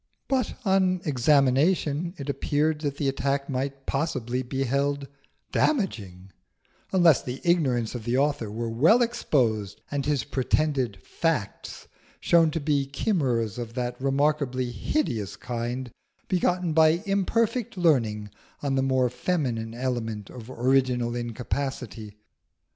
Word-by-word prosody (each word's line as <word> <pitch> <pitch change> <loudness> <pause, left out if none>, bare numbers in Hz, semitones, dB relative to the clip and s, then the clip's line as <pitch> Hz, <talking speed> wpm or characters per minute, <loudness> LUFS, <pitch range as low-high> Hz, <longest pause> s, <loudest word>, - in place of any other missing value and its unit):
But 260 -4 0
on 190 -2 +3
examination 145 +4 +2
it 140 - -7
appeared 150 +2 0
that 140 -2 -2
the 145 - 0
attack 140 +1 0
might 135 +1 -3
possibly 130 -4 -1
be 130 +2 -2
held 140 +2 0 0.4
damaging, 100 - -1 0.6
unless 175 -6 +5
the 125 +1 -5
ignorance 135 -10 +1
of 120 -3 -5
the 120 +3 0
author 140 -5 +1
were 115 +3 -3
well 160 - +4
exposed 115 - 0
and 145 -1 -1
his 145 -2 0
pretended 135 -4 0
facts 155 -12 -3 0.3
shown 165 -2 +4
to 165 - -2
be 145 -2 0
chimeras 130 - 0
of 115 -1 -6
that 125 0 -3
remarkably 135 -2 +1
hideous 115 - -2
kind 120 +1 -4 0.4
begotten 180 -2 +1
by 160 +3 +4
imperfect 205 +3 0
learning 115 - +1 0.3
on 140 -1 0
the 135 - +2
more 130 -1 +2
feminine 125 -7 -2
element 115 -5 -3
of 120 -1 -10
original 125 -1 +1
incapacity. 120 -2 -4
135 Hz, 125 wpm, -26 LUFS, 120-155 Hz, 0.6 s, unless